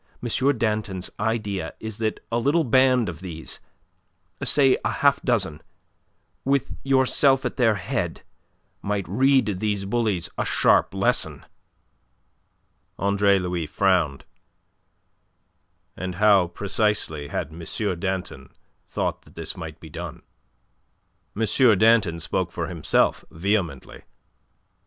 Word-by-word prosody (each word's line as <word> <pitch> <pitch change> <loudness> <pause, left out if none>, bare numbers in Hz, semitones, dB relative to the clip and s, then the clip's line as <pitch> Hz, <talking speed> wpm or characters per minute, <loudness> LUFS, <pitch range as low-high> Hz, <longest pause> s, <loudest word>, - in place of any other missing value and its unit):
Danton's 105 -4 -1
idea 105 -3 -2
is 110 -1 -7
that 110 -1 -2
a 115 - +1
little 145 +7 +2
band 130 -2 +3
of 85 -3 -6
these 85 -3 -6 0.8
say 135 -3 +5
a - - +1
half 140 -1 +2
dozen, 95 - +1 0.8
with 140 0 0
yourself 135 0 +3
at - - -2
their 115 -4 +3
head 95 -4 -3 0.6
might 100 -1 -2
read 130 -2 +2
these 105 -2 -1
bullies 105 -4 0
a - - +2
sharp - - +2
lesson." - - 0 1.5
Andre 100 0 +3
Louis 90 -3 -2
frowned. 85 -4 +1 1.7
"And 90 -1 -5
how, 100 -2 +4
precisely, 100 -5 -1
had 70 - -4
M. 85 +3 -3
Danton 95 0 -4 0.4
thought - - -2
that - - -21
this 80 -1 -5
might 80 -3 -8
be 80 - -12
done?" 85 +1 -7 1.2
M. 110 - +2 0.3
Danton 110 -6 +4
spoke 75 - -2
for - - -3
himself, - - +1
vehemently. 85 -6 -2
100 Hz, 110 wpm, -24 LUFS, 85-115 Hz, 1.7 s, say